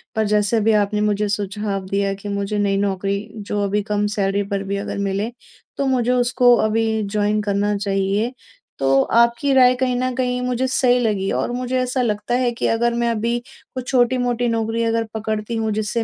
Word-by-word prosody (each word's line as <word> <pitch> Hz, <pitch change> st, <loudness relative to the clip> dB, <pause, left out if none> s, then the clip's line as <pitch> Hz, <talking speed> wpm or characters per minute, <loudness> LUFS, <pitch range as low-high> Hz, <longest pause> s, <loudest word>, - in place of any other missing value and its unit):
पर 220 Hz, 0 st, +1 dB
जैसे 210 Hz, +2 st, +2 dB
अभी 220 Hz, +1 st, +3 dB
आपने 210 Hz, +1 st, -2 dB
मुझे 210 Hz, 0 st, +1 dB
सुझाव 200 Hz, -1 st, -3 dB
दिया 200 Hz, 0 st, 0 dB
कि 200 Hz, +1 st, -8 dB
मुझे 200 Hz, +1 st, -2 dB
नई 200 Hz, -1 st, +1 dB
नौकरी, 200 Hz, +1 st, -1 dB
जो 205 Hz, 0 st, -3 dB
अभी 200 Hz, +1 st, 0 dB
कम 210 Hz, 0 st, -1 dB
सैलरी 200 Hz, 0 st, +1 dB
पर 195 Hz, 0 st, -1 dB
भी 200 Hz, 0 st, -3 dB
अगर 200 Hz, -, -4 dB
मिले 200 Hz, +4 st, -2 dB, 0.5 s
तो 280 Hz, -, 0 dB
मुझे 250 Hz, -2 st, +1 dB
उसको 245 Hz, 0 st, +4 dB
अभी 220 Hz, 0 st, +1 dB
जॉइन 210 Hz, 0 st, +1 dB
करना 205 Hz, 0 st, 0 dB
चाहिए। 200 Hz, +3 st, -1 dB, 0.5 s
तो 135 Hz, 0 st, +3 dB
आपकी 235 Hz, +4 st, +3 dB
राय 255 Hz, -1 st, +6 dB
कहीं 250 Hz, 0 st, 0 dB
न 255 Hz, +1 st, -1 dB
कहीं 250 Hz, -1 st, -1 dB
मुझे 250 Hz, 0 st, -1 dB
सही 250 Hz, -1 st, +3 dB
लगी 205 Hz, -5 st, 0 dB
और -, -, -1 dB
मुझे 250 Hz, +1 st, -2 dB
ऐसा 255 Hz, +1 st, 0 dB
लगता 215 Hz, 0 st, -1 dB
है 250 Hz, -1 st, +1 dB
कि 235 Hz, -, -2 dB
अगर 235 Hz, +1 st, +1 dB
मैं 235 Hz, 0 st, 0 dB
अभी 230 Hz, +1 st, -1 dB, 0.4 s
कुछ 255 Hz, -1 st, -5 dB
छोटी-मोटी 245 Hz, -1 st, +1 dB
नौकरी 225 Hz, 0 st, -1 dB
अगर 230 Hz, 0 st, +1 dB
पकड़ती 220 Hz, +1 st, -3 dB
हूँ 220 Hz, -1 st, -1 dB
जिससे 215 Hz, +2 st, -1 dB
220 Hz, 190 wpm, -20 LUFS, 205-245 Hz, 0.5 s, राय